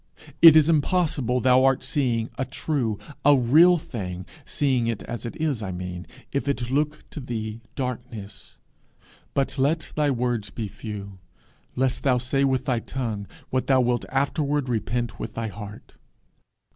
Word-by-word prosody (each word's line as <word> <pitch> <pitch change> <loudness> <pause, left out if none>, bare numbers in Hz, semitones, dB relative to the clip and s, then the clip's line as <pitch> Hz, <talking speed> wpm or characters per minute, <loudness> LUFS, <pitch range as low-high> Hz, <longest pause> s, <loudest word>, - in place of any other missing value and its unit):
It 165 -2 +11
is 155 -1 +6
impossible 150 -6 +1
thou 130 +1 +5
art 135 -1 +3
seeing 120 -5 0
a 130 - -1
true, 130 -4 -2 0.3
a 145 0 +6
real 160 +9 +6
thing 90 - -6 0.2
seeing 130 -5 +1
it 115 -3 -2
as 120 0 -5
it - - -7
is, 150 -7 0
I 95 -3 -4
mean 90 -1 -6 0.2
if 140 0 -2
it 125 -3 -1
looks 150 +2 +1
to - - -6
thee 115 -3 -5
darkness. 120 -6 -6 0.8
But 135 0 0
let 155 +4 0
thy 150 -1 +2
words 120 -5 -1
be 110 +2 -5
few, 100 -2 -8 0.6
lest 130 0 0
thou 130 -3 +3
say 130 +3 0
with 130 -2 +1
thy 125 -3 +1
tongue 115 -5 -4 0.2
what 130 -1 0
thou 135 -1 +5
wilt 120 -1 +1
afterward 140 0 0
repent 120 0 -2
with 110 - -6
thy 115 -1 -2
heart. 105 +1 -10
125 Hz, 160 wpm, -25 LUFS, 115-140 Hz, 0.8 s, It